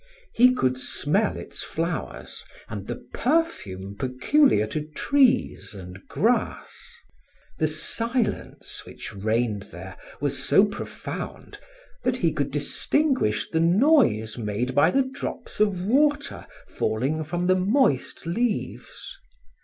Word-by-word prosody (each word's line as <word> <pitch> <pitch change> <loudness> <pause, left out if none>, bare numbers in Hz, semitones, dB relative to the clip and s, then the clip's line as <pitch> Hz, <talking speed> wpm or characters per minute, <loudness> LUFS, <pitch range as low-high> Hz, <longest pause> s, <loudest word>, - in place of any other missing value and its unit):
He 250 +2 +6
could 130 - +1
smell 190 +10 +1
its - - -7
flowers - - -4 0.2
and - - -7
the - - -6
perfume 100 - -1
peculiar 130 - +3
to 150 +7 -3
trees 255 - +1
and 90 -1 -9
grass. - - -1 0.6
The 155 - +3
silence 230 - -2
which - - -9
reigned 110 0 -1
there 95 +2 -9 0.2
was 140 -1 -1
so 195 - +5
profound 205 -1 -7 0.4
that - - +1
he - - +2
could - - -1
distinguish 270 - +1
the 160 - +1
noise 170 - +3
made 110 +4 -2
by 145 +5 +5
the 270 +9 +3
drops 260 -3 -6
of 195 -4 +1
water 290 +6 +1 0.2
falling 135 +8 -1
from 175 +3 -2
the 185 +1 +4
moist 190 - +1
leaves. 215 +6 -3
165 Hz, 115 wpm, -25 LUFS, -, 0.6 s, He